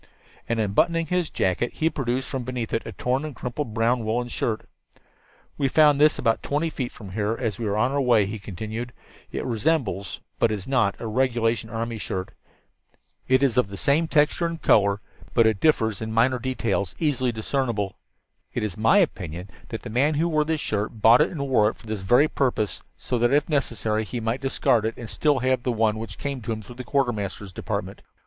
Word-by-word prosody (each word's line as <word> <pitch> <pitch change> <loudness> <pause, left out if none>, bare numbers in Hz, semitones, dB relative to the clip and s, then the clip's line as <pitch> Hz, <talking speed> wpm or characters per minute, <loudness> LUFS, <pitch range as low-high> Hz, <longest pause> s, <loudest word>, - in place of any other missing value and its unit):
And, 115 -1 0
unbuttoning 165 +11 +2
his 180 0 0
jacket, 95 +6 0
he 160 - 0
produced 130 -4 -1
from 130 -2 -3
beneath 125 -2 -4
it 115 - -1
a - - -5
torn 130 +3 -1
and 155 -3 -6
crumpled 120 -2 -4
brown 115 +1 +2
woolen 120 +3 -1
shirt. 110 -2 -2 0.9
"We 140 - +2
found 150 0 +5
this 155 0 +5
about 115 -1 +1
twenty 155 +3 -1
feet 130 -5 -4
from 100 -4 -11
here 105 +3 -1
as 115 -5 -2
we 115 - -2
were 100 +1 0
on 125 +4 +2
our 140 0 +1
way," 120 -5 +4
he 105 +2 -5
continued. 110 +5 -6 0.4
"It - - -3
resembles, 115 - -1 0.2
but 115 - +4
it - - +1
is 100 - -8
not, 120 -7 +2
a - - -6
regulation 115 -1 0
army 115 0 -3
shirt. 95 -1 -4 1.0
It 130 +1 +4
is 130 -4 +2
of 125 - +4
the 100 0 -8
same 150 +7 +2
texture 155 +2 +2
and 165 -1 -5
color, 100 -5 +3 0.3
but 115 - +5
it 110 -3 +2
differs 110 -10 +2
in 110 0 -3
minor 125 +3 +3
details 115 -7 -1
easily 130 -6 +1
discernible. 110 -3 -2 0.6
It - - -1
is 105 -4 -3
my 110 - +4
opinion 90 - -1 0.2
that - - -5
the - - -6
man 140 +6 +2
who 160 +3 +2
wore 155 -2 +1
this 160 -1 -1
shirt 105 +1 -2
bought 115 +5 +7
it 155 - +3
and 140 -6 -4
wore 110 -5 +4
it - - -7
for - - -18
this 110 -2 -4
very 120 +10 +4
purpose, 125 -8 -1 0.2
so 125 -2 -2
that, 120 +1 +3
if 145 +1 +3
necessary, 115 -7 0
he 120 +3 -5
might 115 +3 -2
discard 130 -4 +2
it 110 0 -2
and 115 -2 -8
still 150 -2 +2
have 130 0 +1
the 125 - 0
one 110 -1 +1
which 115 - -7
came 140 -3 -4
to 115 - -4
him 110 -1 -4
through 120 +4 -12
the - - -7
Quartermaster's 105 -8 -1
Department. - - -4
120 Hz, 210 wpm, -25 LUFS, 110-135 Hz, 1.0 s, bought